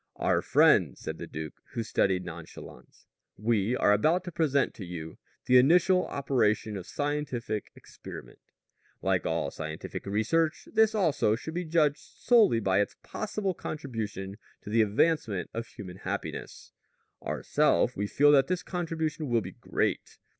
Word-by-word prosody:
"Our - - +1
friends," - - +4
said - - -6
the - - -6
duke, 80 0 -6 0.2
with 115 - -2
studied 95 -4 +1
nonchalance, 80 -6 -11 0.3
"we 110 +1 +1
are 105 - +4
about 160 - +2
to 180 - -6
present 145 -4 +1
to 100 - -9
you 85 -3 -7 0.3
the 125 0 +6
initial 180 +7 +4
operation 110 -6 0
of 95 -3 -7
scientific 145 -7 -3
experiment. - - -11 0.6
Like - - +1
all - - -1
scientific 80 +4 -6
research, 155 +11 0
this 220 0 +4
also 155 - +2
should 160 +7 -7
be 175 +1 -3
judged 155 -3 +2
solely 220 - +3
by 95 -2 +2
its 105 - -3
possible 210 -3 -3
contribution 110 - -5 0.3
to 105 - -7
the 115 +1 +4
advancement 110 - +1
of 115 0 -4
human 90 -3 -10
happiness. - - -6 0.5
Ourself, - - +1
we 100 +1 -2
feel 145 +7 +4
that 135 -2 +5
this 185 0 -1
contribution 160 -4 -3
will 120 -1 +2
be - - -7
great. - - -2
125 Hz, 145 wpm, -28 LUFS, 100-160 Hz, 0.6 s, the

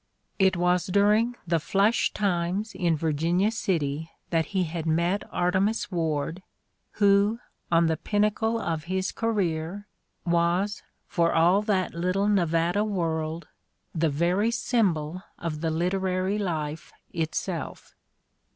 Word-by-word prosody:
It 190 -2 +4
was 180 0 +2
during 210 +5 +3
the 165 -1 +1
"flush 200 +8 +2
times" 195 +1 -1
in 175 -3 +1
Virginia 165 +6 +1
City 160 -8 -1 0.2
that 165 -1 +1
he 190 -2 0
had 165 -1 -4
met 170 +5 +1
Artemus 190 +5 0
"Ward 160 0 -1 0.5
who, 205 +2 +3 0.3
on 165 0 +4
the 160 -1 +1
pinnacle 215 +4 0
of 165 -6 -3
his 185 +2 -1
career, 195 -4 -2 0.4
was, 175 +4 +1 0.2
for 170 -3 +1
all 175 +5 +4
that 200 -4 0
little 185 +4 0
Nevada 175 -1 +2
world, 165 -5 -2 0.5
the 165 -1 +1
very 175 +9 +1
symbol 185 -9 0 0.2
of 155 -3 -4
the 165 - 0
literary 185 +4 0
life 160 -5 -3 0.2
itself. 160 -2 -4
180 Hz, 120 wpm, -26 LUFS, 165-200 Hz, 0.5 s, It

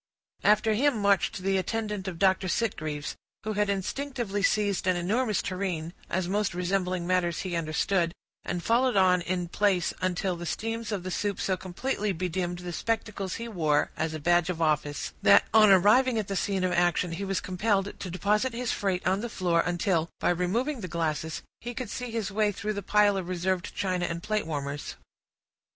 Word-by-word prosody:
After 215 +1 +4
him 270 +3 +2
marched 200 -2 +1
the 195 0 +2
attendant 210 0 -2
of 180 -3 -4
Dr. 190 +1 +3
Sitgreaves, 155 -8 -2 0.3
who 215 +1 -2
had 205 0 +1
instinctively 205 +1 -2
seized 200 -2 +1
an 185 - +3
enormous 210 +4 0
tureen, 180 -4 -3 0.2
as 185 -2 -1
most 200 -1 0
resembling 180 -1 -1
matters 175 -1 +1
he 180 -2 -3
understood, 165 +2 +1 0.3
and 175 -1 -3
followed 245 +1 +2
on 180 -1 +5
in 175 0 -2
place, 190 -1 +1
until 185 0 0
the 170 0 -6
steams 225 +2 -3
of 200 -4 -2
the 185 - -4
soup 200 +1 -1
so 190 - +1
completely 200 +4 -2
bedimmed 175 0 -2
the 175 0 -6
spectacles 210 -1 -2
he 230 - -5
wore, 155 -9 +1
as 160 0 -2
a - - -4
badge 175 +2 +3
of 175 -3 -2
office, 150 -2 0
that, 100 -1 +6
on 215 -1 +7
arriving 215 +6 +5
at 215 -3 -1
the 195 - -3
scene 195 0 0
of 185 - +1
action, 175 0 +2
he 170 +4 -4
was 195 -1 -1
compelled 195 +1 0
to 185 - -5
deposit 210 +7 +1
his 240 0 -2
freight 190 -3 -1
on 190 +2 +2
the 240 - -4
floor, 175 -5 +1
until, 175 -1 0
by - - +2
removing 225 - -1
the 185 - -4
glasses, 160 -2 -2 0.2
he 240 +1 -6
could 250 -4 -5
see 250 -1 -4
his 225 -3 -3
way 210 +1 +2
through 210 +2 -3
the 200 - -4
piles 205 0 +3
of 185 -2 -4
reserved 185 0 -1
china 185 -2 0
and 170 0 -4
plate 215 -4 -1
warmers. 145 -2 -4
190 Hz, 190 wpm, -28 LUFS, 175-210 Hz, 0.3 s, on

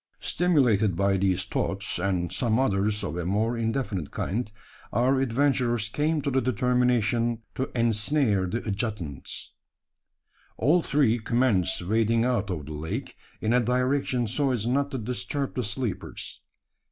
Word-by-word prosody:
Stimulated 125 - +2
by 100 +2 +2
these 95 -1 +1
thoughts 100 -2 -2
and 90 -2 -1
some 115 -3 +1
others 105 -4 +1
of 95 - -3
a 90 - -2
more 105 +6 0
indefinite 115 - -2
kind 110 +2 -3 0.4
our 130 +4 +2
adventurers 125 -3 +1
came 150 +4 0
to 140 - 0
the 130 0 +2
determination 120 -1 +1
to 130 - -2
ensnare 110 -2 +2
the 115 +6 -3
adjutants! 100 - -4 1.0
All 155 +9 +3
three 135 -7 +2
commenced 110 -7 +1
wading 115 +4 +2
out 120 -6 0
of 80 -6 -3
the 75 - -7
lake 75 +2 -5 0.3
in 110 +2 +1
a 125 - +5
direction 125 +1 +1
so 135 +6 0
as 120 -5 0
not 140 +4 +1
to 135 - -4
disturb 125 +4 -3
the 125 - -1
sleepers. 105 +1 -4
115 Hz, 140 wpm, -26 LUFS, 100-130 Hz, 1.0 s, a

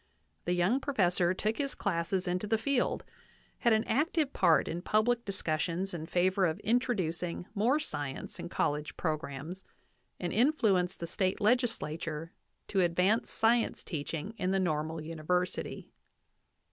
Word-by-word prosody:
The 175 - +1
young 180 +9 +2
professor 180 -10 +2
took 215 +4 -1
his 275 -1 -1
classes 180 0 -1
into 180 +3 -1
the 225 +1 +2
field, 250 +3 0 0.6
had 235 - +3
an 220 0 +4
active 300 +3 +1
part 160 - +4
in 170 +2 -3
public 235 +5 +2
discussions 180 0 -2
in 160 -2 -5
favor 185 +2 +2
of 160 - -2
introducing 185 -8 0
more 230 +7 +3
science 145 - -5
in - - -5
college 150 -1 -1
programs, 155 +2 -3 0.6
and 175 - -2
influenced 205 - +2
the - - -1
State 185 +2 0
legislature 165 -9 0 0.4
to 195 - +2
advance 180 +6 +2
science 230 +1 +2
teaching 160 +4 -4
in 185 - 0
the 195 0 +2
Normal 160 -2 -1
University. 165 +3 -2
185 Hz, 135 wpm, -31 LUFS, 165-220 Hz, 0.6 s, an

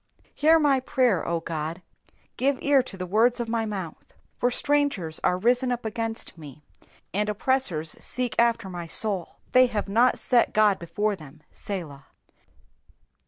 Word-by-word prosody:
2 - - -33
Hear 315 +2 +4
my 290 -4 +3
prayer, 250 -7 +1
O 170 0 0
God; 165 +2 -5 0.5
give 270 +1 +1
ear 280 -1 +4
to 245 -6 -8
the 185 - -4
words 225 +7 +2
of 235 - -2
my 225 -1 -1
mouth. 190 -6 -6
3 - - -28 0.2
For 245 - +1
strangers 275 - 0
are 180 - +2
risen 250 +5 +2
up 240 -2 -3
against 225 -4 -4
me, 150 -1 -12 0.5
and 210 +2 0
oppressors 210 - 0
seek 250 -2 -1
after 235 -4 +2
my 175 -2 -6
soul: 190 0 -1 0.2
they 255 0 +6
have 215 -4 -3
not 235 +5 +3
set 245 -2 +2
God 210 -2 +4
before 205 +5 -2
them. 155 -2 -15
Selah. 160 -9 -6
215 Hz, 165 wpm, -25 LUFS, 175-250 Hz, 0.5 s, they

